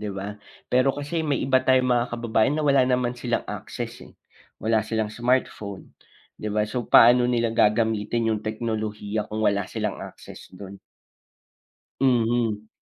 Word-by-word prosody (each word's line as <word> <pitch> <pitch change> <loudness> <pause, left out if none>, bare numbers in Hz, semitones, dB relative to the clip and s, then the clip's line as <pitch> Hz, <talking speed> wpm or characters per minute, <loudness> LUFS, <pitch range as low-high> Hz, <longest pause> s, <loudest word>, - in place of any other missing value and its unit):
'di 105 - -4
ba? 100 +1 -6 0.3
Pero 130 +2 +3
kasi 145 +3 -3
may 150 -3 0
iba 130 0 +3
tayong 130 -1 +3
mga 120 0 +2
kababayan 115 +2 +1
na 155 - -1
wala 140 -2 +4
naman 125 -1 +1
silang 120 -1 -2
access, - - -7
eh. - - -22 0.4
Wala 110 +1 +1
silang 110 0 -2
smartphone, 120 -5 -2 0.5
'di 105 - -3
ba? 105 0 0
So 115 +3 -4
paano 120 +1 +6
nila 120 -2 +1
gagamitin 110 +1 +1
'yong 105 - -2
teknolohiya 110 -1 -3
kung 110 +1 -3
wala 100 -2 +1
silang - - -3
access - - -11
do'n? 100 0 -10 1.2
Mhm. 115 -4 +1
115 Hz, 150 wpm, -24 LUFS, 105-125 Hz, 1.2 s, paano